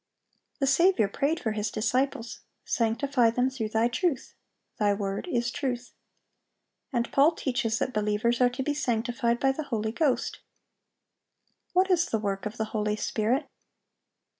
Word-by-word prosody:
The 275 - +1
Saviour 275 - +4
prayed 285 +10 0
for 220 - -1
His 210 0 -2
disciples, 240 +3 -1 0.3
"Sanctify 235 +2 +2
them 250 +3 +1
through 225 -5 -3
Thy 225 +2 +2
truth: 270 +3 -1 0.5
Thy 205 -1 +3
word 200 - -3
is 240 -7 0
truth."(795) 250 -3 -3 1.0
And 235 -1 0
Paul 290 +5 +5
teaches 245 -7 -1
that 255 - -2
believers 215 +3 +1
are 250 - +6
to 250 +2 -4
be 295 - 0
"sanctified 240 -3 0
by 270 - +3
the 295 +3 -4
Holy 220 -4 -2
Ghost."(796) 275 +2 -6
What 375 +1 +3
is 350 -1 +3
the 225 - 0
work 200 -1 -2
of 215 +3 -9
the 220 - -1
Holy 210 -1 0
Spirit? 230 +7 0
240 Hz, 150 wpm, -27 LUFS, 220-275 Hz, 1.0 s, are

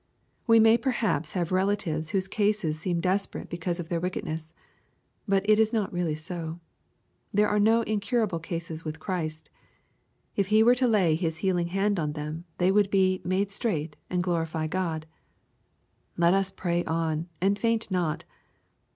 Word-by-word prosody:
We 230 -1 +7
may 225 +1 +6
perhaps 220 - 0
huve 175 -2 -1
relatives 185 -5 0
whose 190 +2 0
case 210 +1 +1
seems 170 +2 -2
desperate 190 +3 -1
because 170 +1 -3
of 170 -1 -6
their 170 - 0
wickedness. 160 -3 -4 0.8
But 195 0 +1
it 215 0 +5
is 220 -1 +3
not 215 -6 -1
really 175 -3 0
so. 165 +1 -6 0.7
There 210 +1 +3
are 210 0 +1
no 225 +2 +4
incurable 215 -3 0
cases 165 -1 -5
with 155 0 -5
Christ, 160 -3 -4 0.8
If 200 -2 +1
He 215 +2 +5
were 240 +2 +6
to 250 0 +2
lay 195 -8 +3
His 160 0 -1
healing 175 -2 +1
hand 195 +2 0
on 150 -2 -1
them, 155 +2 -5
they 180 +1 +3
would 205 0 +3
be 185 -1 +2
^*made 190 +2 0
straight, 165 -8 -2
and 180 -1 0
glorify 165 -3 -1
God." 160 -2 -2 1.1
Let 170 +1 +4
us 195 0 +2
pray 175 -2 -1
on, 160 0 -1
and 200 +3 +1
faint 230 -3 0
not. 175 -4 -1
185 Hz, 160 wpm, -27 LUFS, 165-205 Hz, 1.1 s, We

